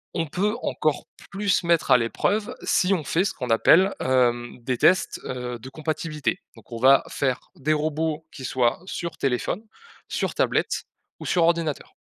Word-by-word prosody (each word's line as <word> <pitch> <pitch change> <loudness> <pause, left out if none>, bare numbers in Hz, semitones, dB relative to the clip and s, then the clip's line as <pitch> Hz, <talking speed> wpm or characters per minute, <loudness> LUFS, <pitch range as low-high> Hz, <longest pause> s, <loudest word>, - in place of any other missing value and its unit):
On 165 - 0
peut 200 +8 -1
encore - - -1 0.2
plus 200 -1 +1
mettre 170 -4 +2
à 125 - +9
l'épreuve, 205 - -1
si 190 +1 +2
on 165 - -4
fait 165 +5 +1
ce 195 - -1
qu'on 125 -3 -4
appelle, 185 - +5
hem, 120 -2 +1
des 125 +1 -2
tests, 185 +9 +3
heu, 125 -1 -5
de 130 - -9
compatibilité. 155 +1 -3 0.2
Donc, 115 +1 -18
on 115 - -5
va 135 +3 +6
faire 130 -2 -2
des 150 +3 0
robots 155 +1 -1
qui 130 - -10
soient 125 0 +1
sur 170 -3 -5
téléphone, 135 - -1 0.5
sur - - -2
tablette - - 0 0.3
ou - - -8
sur 175 - +2
ordinateur. 165 -3 0
150 Hz, 170 wpm, -24 LUFS, 125-170 Hz, 0.5 s, à